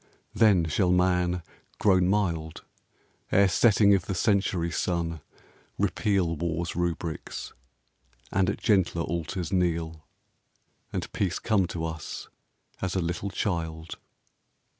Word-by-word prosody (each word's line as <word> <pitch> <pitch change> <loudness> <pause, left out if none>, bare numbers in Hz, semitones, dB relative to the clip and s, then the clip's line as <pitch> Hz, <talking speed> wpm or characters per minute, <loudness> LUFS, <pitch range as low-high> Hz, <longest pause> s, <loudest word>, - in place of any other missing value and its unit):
Then 100 -7 +4
shall 90 +4 +1
man, 90 -1 +2 0.3
grown 95 -3 +4
mild, 85 -6 -1 0.7
Ere 100 0 +5
setting 100 +1 +5
of 95 -2 +1
the 95 - -2
century 95 -3 +1
sun 85 -3 -1 0.6
repeal 95 -5 +1
War's 85 +1 -2
rubrics, 85 -2 -3 0.8
and 95 -1 +2
at - - -2
gentler 95 -6 +2
altars 85 +2 -3
kneel, 80 -3 0 0.9
And - - -4
Peace 95 -3 0
come 100 -5 +1
to 80 -1 -4
us 80 -1 -6 0.5
as 95 -1 -2
a - - +2
little 85 +3 -2
child." 85 -4 -3
90 Hz, 115 wpm, -27 LUFS, 85-95 Hz, 0.9 s, Ere